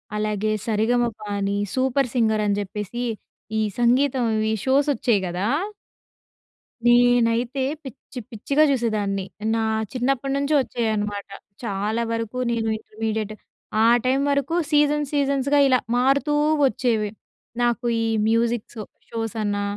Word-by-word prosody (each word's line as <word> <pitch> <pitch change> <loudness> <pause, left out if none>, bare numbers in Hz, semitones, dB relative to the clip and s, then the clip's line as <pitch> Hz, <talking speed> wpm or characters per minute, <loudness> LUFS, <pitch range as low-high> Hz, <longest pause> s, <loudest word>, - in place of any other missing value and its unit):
అలాగే 210 0 -1 0.2
'సరిగమపా'ని, 215 -3 0 0.2
'super 260 -1 +1
singer' 220 -3 +2
అని 205 -1 +1
చెప్పేసి 210 +4 -5 0.6
ఈ - - +2 0.2
సంగీతంవీ 240 -3 +2
షోస్ 275 +3 +3
వచ్చాయి 235 -5 +1
గదా! 180 +3 -2 1.4
నేనైతే 240 +1 +3 0.2
పిచ్చి 265 -1 -9
పిచ్చిగా 275 +7 +1
చూసేదాన్ని. 210 -6 -1 0.3
నా - - 0 0.3
చిన్నప్పటి 270 +2 0
నుంచి 280 +2 0
వచ్చేవనమాట. 210 -4 -2 0.4
చాలా 210 +1 -1
వరకు 230 +1 -3
నేను 225 -1 -1
ఇంటర్మీడియట్ 215 -1 -4 0.5
ఆ - - +5 0.2
టైం 260 +2 +2
వరకు 280 +4 0 0.2
సీజన్ 295 0 +3
సీజన్స్‌గా 280 0 +2
ఇలా 255 -2 +4 0.2
మారుతూ 275 +4 +2 0.3
వచ్చేవి. 225 -3 0 0.5
నాకు 240 0 +1 0.2
ఈ - - 0 0.2
మ్యూజిక్ 230 0 +1 0.4
షోస్ 225 -1 -4
అన్నా, 205 0 -1
235 Hz, 110 wpm, -23 LUFS, 215-260 Hz, 1.4 s, ఆ